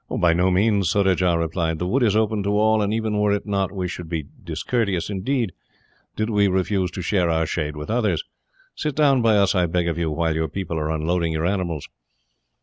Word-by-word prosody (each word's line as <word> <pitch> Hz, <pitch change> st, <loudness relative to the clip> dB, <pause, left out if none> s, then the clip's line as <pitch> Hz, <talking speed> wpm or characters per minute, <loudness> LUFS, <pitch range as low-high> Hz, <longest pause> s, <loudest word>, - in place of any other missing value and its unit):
"By 85 Hz, -1 st, +2 dB
no 90 Hz, +2 st, +2 dB
means," 100 Hz, -1 st, +2 dB
Surajah 90 Hz, -4 st, +2 dB
replied. 80 Hz, 0 st, -1 dB
"The 90 Hz, -, -3 dB
wood 125 Hz, +10 st, +1 dB
is 110 Hz, -4 st, +3 dB
open 110 Hz, -1 st, +1 dB
to 100 Hz, +1 st, 0 dB
all, 110 Hz, 0 st, +3 dB
and 100 Hz, 0 st, 0 dB
even 110 Hz, -1 st, -1 dB
were 105 Hz, 0 st, +2 dB
it 100 Hz, -, -2 dB
not, 100 Hz, -2 st, -1 dB
we 95 Hz, -2 st, -3 dB
should 90 Hz, -2 st, -7 dB
be 80 Hz, -3 st, -3 dB, 0.2 s
discourteous, 105 Hz, -7 st, -1 dB
indeed, 110 Hz, +2 st, -1 dB, 0.6 s
did 110 Hz, -, -1 dB
we 100 Hz, -1 st, +3 dB
refuse 95 Hz, 0 st, 0 dB
to 90 Hz, -, -5 dB
share 90 Hz, -2 st, +1 dB
our 80 Hz, 0 st, +1 dB
shade 75 Hz, -1 st, -3 dB
with 75 Hz, +6 st, -6 dB
others. 105 Hz, -9 st, +1 dB, 0.5 s
Sit 150 Hz, -3 st, -3 dB
down 140 Hz, -4 st, +4 dB
by 110 Hz, -2 st, +4 dB
us, 100 Hz, -1 st, +3 dB
I 90 Hz, -3 st, +2 dB
beg 85 Hz, +1 st, 0 dB
of 85 Hz, -1 st, -1 dB
you, 85 Hz, -2 st, 0 dB
while 80 Hz, +1 st, 0 dB
your 80 Hz, 0 st, -1 dB
people 85 Hz, -2 st, -4 dB
are 75 Hz, 0 st, -2 dB
unloading 80 Hz, +1 st, 0 dB
your 80 Hz, +1 st, -1 dB
animals." 90 Hz, -5 st, -2 dB
95 Hz, 215 wpm, -22 LUFS, 85-105 Hz, 0.6 s, down